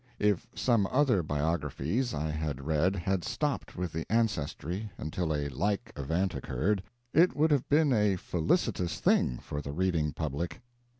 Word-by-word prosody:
If 105 Hz, -4 st, +1 dB
some 115 Hz, -6 st, +2 dB
other 130 Hz, -7 st, +3 dB
biographies 80 Hz, -, -1 dB
I 75 Hz, +1 st, -2 dB
have 75 Hz, -3 st, -2 dB
read 80 Hz, +6 st, +1 dB
had 95 Hz, 0 st, -1 dB
stopped 150 Hz, -2 st, -2 dB
with 90 Hz, -2 st, -3 dB
the 80 Hz, +4 st, -4 dB
ancestry 105 Hz, -, -1 dB
until 80 Hz, +2 st, -2 dB
a 75 Hz, -1 st, 0 dB
like 100 Hz, -, -1 dB
event 85 Hz, +7 st, 0 dB
occurred, 95 Hz, +8 st, 0 dB, 0.3 s
it 170 Hz, +4 st, +5 dB
would 155 Hz, +2 st, +3 dB
have 140 Hz, -4 st, +2 dB
been 145 Hz, -1 st, +4 dB
a 105 Hz, -3 st, +3 dB
felicitous 90 Hz, -, 0 dB
thing, -, -, +3 dB
for 75 Hz, -, -5 dB
the 70 Hz, -, -5 dB
reading 85 Hz, -2 st, +1 dB
public. 80 Hz, +3 st, -3 dB
90 Hz, 155 wpm, -30 LUFS, 75-105 Hz, 0.3 s, it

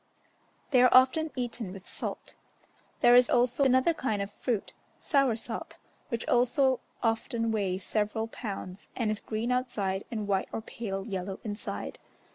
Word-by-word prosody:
They 255 Hz, -3 st, +6 dB
are 250 Hz, -, +7 dB
often 265 Hz, +5 st, +5 dB
eaten 240 Hz, -5 st, -3 dB
with 190 Hz, -1 st, -10 dB
salt. -, -, -6 dB, 0.7 s
There 240 Hz, -, +7 dB
is 250 Hz, 0 st, +6 dB
also 245 Hz, +2 st, +3 dB
another 260 Hz, +5 st, +4 dB
kind 220 Hz, -9 st, -1 dB
of 200 Hz, 0 st, -3 dB
fruit, 225 Hz, 0 st, -2 dB, 0.3 s
"sauersop," 240 Hz, -5 st, 0 dB, 0.3 s
which 230 Hz, -1 st, -3 dB
also 255 Hz, +1 st, +3 dB, 0.2 s
often 230 Hz, 0 st, 0 dB
weighs 190 Hz, -3 st, -1 dB
several 215 Hz, +1 st, -1 dB
pounds, 200 Hz, -4 st, -7 dB
and 225 Hz, -3 st, 0 dB
is 215 Hz, -, -3 dB
green 225 Hz, +3 st, -2 dB
outside 205 Hz, -6 st, -1 dB
and 215 Hz, -3 st, -3 dB
white 195 Hz, -1 st, 0 dB
or -, -, -3 dB
pale 195 Hz, -3 st, -5 dB
yellow 190 Hz, -1 st, -4 dB
inside. 210 Hz, -1 st, -5 dB
225 Hz, 145 wpm, -29 LUFS, 205-250 Hz, 0.7 s, are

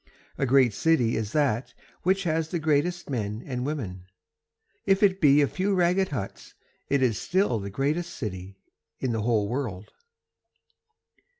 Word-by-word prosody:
A 135 Hz, -, +1 dB
great 130 Hz, -3 st, +4 dB
city 125 Hz, -4 st, +2 dB
is 110 Hz, -1 st, -2 dB
that 125 Hz, -5 st, 0 dB, 0.3 s
which 190 Hz, +2 st, +1 dB
has 160 Hz, -2 st, 0 dB
the 175 Hz, -, -1 dB
greatest 160 Hz, +3 st, 0 dB
men 110 Hz, -4 st, -3 dB
and 125 Hz, -1 st, -3 dB
women, 95 Hz, -12 st, -5 dB, 0.8 s
If 195 Hz, +1 st, +3 dB
it 190 Hz, -1 st, +3 dB
be 145 Hz, -1 st, +6 dB
a -, -, +2 dB
few 195 Hz, +5 st, -1 dB
ragged 180 Hz, +2 st, +2 dB
huts 115 Hz, -9 st, -6 dB, 0.3 s
it 140 Hz, -1 st, +2 dB
is 115 Hz, -4 st, +1 dB
still 185 Hz, -, +1 dB
the 100 Hz, 0 st, -5 dB
greatest 150 Hz, -, -1 dB
city 95 Hz, -2 st, -6 dB, 0.4 s
in 130 Hz, -, -1 dB
the 115 Hz, -1 st, -1 dB
whole 110 Hz, -2 st, +1 dB
world. 110 Hz, -5 st, -4 dB
135 Hz, 155 wpm, -26 LUFS, 110-165 Hz, 0.8 s, be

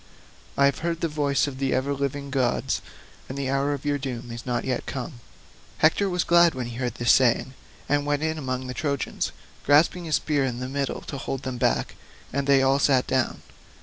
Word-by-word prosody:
I 140 Hz, -, +5 dB
have 140 Hz, -, +2 dB
heard 165 Hz, 0 st, -2 dB
the 165 Hz, -, +1 dB
voice 145 Hz, -3 st, +1 dB
of 135 Hz, -2 st, -6 dB
the 135 Hz, -1 st, +1 dB
ever 135 Hz, +2 st, 0 dB
living 140 Hz, 0 st, -3 dB
gods, 130 Hz, -3 st, 0 dB, 0.5 s
and 130 Hz, -, -5 dB
the 135 Hz, -1 st, -1 dB
hour 140 Hz, +1 st, +1 dB
of 145 Hz, 0 st, -4 dB
your 145 Hz, -1 st, +1 dB
doom 125 Hz, -3 st, -5 dB
is 120 Hz, +2 st, -8 dB
not 120 Hz, -1 st, -1 dB
yet 130 Hz, -2 st, -2 dB
come." 130 Hz, -1 st, -5 dB, 0.6 s
Hector 195 Hz, +6 st, +3 dB
was 180 Hz, -1 st, 0 dB
glad 170 Hz, -2 st, +5 dB
when 130 Hz, -1 st, -3 dB
he 120 Hz, 0 st, -7 dB
heard 125 Hz, -2 st, -2 dB
this 120 Hz, 0 st, +3 dB
saying, 130 Hz, 0 st, +3 dB, 0.3 s
and 145 Hz, 0 st, +2 dB
went 145 Hz, +1 st, 0 dB
in 160 Hz, 0 st, -1 dB
among 130 Hz, -2 st, -3 dB
the 125 Hz, -, -5 dB
Trojans, 140 Hz, -1 st, -2 dB, 0.3 s
grasping 160 Hz, +5 st, +4 dB
his 155 Hz, -2 st, +1 dB
spear 145 Hz, -3 st, +1 dB
by 120 Hz, -, -7 dB
the 125 Hz, +1 st, -4 dB
middle 140 Hz, 0 st, -2 dB
to 140 Hz, -, -6 dB
hold 135 Hz, -1 st, -4 dB
them 130 Hz, -2 st, -4 dB
back, 60 Hz, -, 0 dB, 0.4 s
and 140 Hz, +1 st, -1 dB
they 135 Hz, -1 st, +5 dB
all 135 Hz, +1 st, +3 dB
sat 135 Hz, -3 st, +3 dB
down. 130 Hz, -1 st, -1 dB
140 Hz, 215 wpm, -25 LUFS, 130-145 Hz, 0.6 s, I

